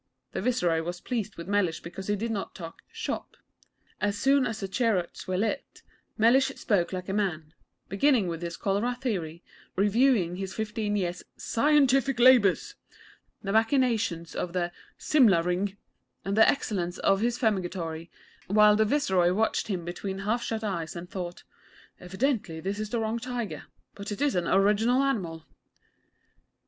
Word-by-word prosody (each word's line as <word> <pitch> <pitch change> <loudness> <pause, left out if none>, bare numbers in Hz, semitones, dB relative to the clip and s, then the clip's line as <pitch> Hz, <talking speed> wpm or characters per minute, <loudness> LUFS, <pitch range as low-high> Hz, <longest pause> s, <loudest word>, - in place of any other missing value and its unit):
The - - -3
Viceroy 180 -9 +1
was 175 +2 -5
pleased 230 -2 -3
with 170 +1 -8
Mellish 200 -5 +1
because 190 +3 -8
he 205 - +1
did 225 +3 -3
not 205 -3 -4
talk 165 -2 -9
'shop.' - - -5 0.6
As 205 0 0
soon 270 +4 +3
as 220 0 -4
the 195 - -3
cheroots 195 -4 -1
were 185 0 -1
lit, 225 +8 -3 0.3
Mellish 245 +4 +5
spoke 195 -6 0
like 185 -1 -5
a 195 - -2
man; 165 -7 -2 0.3
beginning 225 0 +2
with 165 -1 -4
his 170 -1 -5
cholera 210 +5 0
theory, 180 -10 -4 0.3
reviewing 205 -3 +2
his 190 0 -5
fifteen 215 -1 -2
years' 180 -3 -2 0.2
'scientific 270 -1 +2
labours,' 255 - +5 0.7
the 195 - -2
machinations 225 - +1
of 175 - -3
the 175 -1 -1 0.3
'Simla 220 - +4
Ring,' 185 +3 -1 0.5
and 195 +1 -1
the 220 - +6
excellence 180 -9 -1
of 195 0 +2
his 235 +1 +1
Fumigatory, 175 -6 -2 0.4
while 210 +1 +6
the 220 +1 +3
Viceroy 190 -9 +2
watched 220 +4 0
him 185 -5 -3
between 190 +2 -5
half 230 +3 +1
shut 225 -2 -3
eyes 175 -6 -3
and 175 +1 -8
thought 175 -2 -6 0.6
'Evidently 190 - -2
this 195 +4 -3
is 215 -1 -3
the 235 - -1
wrong 220 +1 -1
tiger; 245 -2 -5 0.3
but 200 +1 -7
it 205 - -4
is 285 -1 +2
an 175 -2 0
original 210 +7 +3
animal.' 175 -12 -2
205 Hz, 155 wpm, -27 LUFS, 180-230 Hz, 0.7 s, the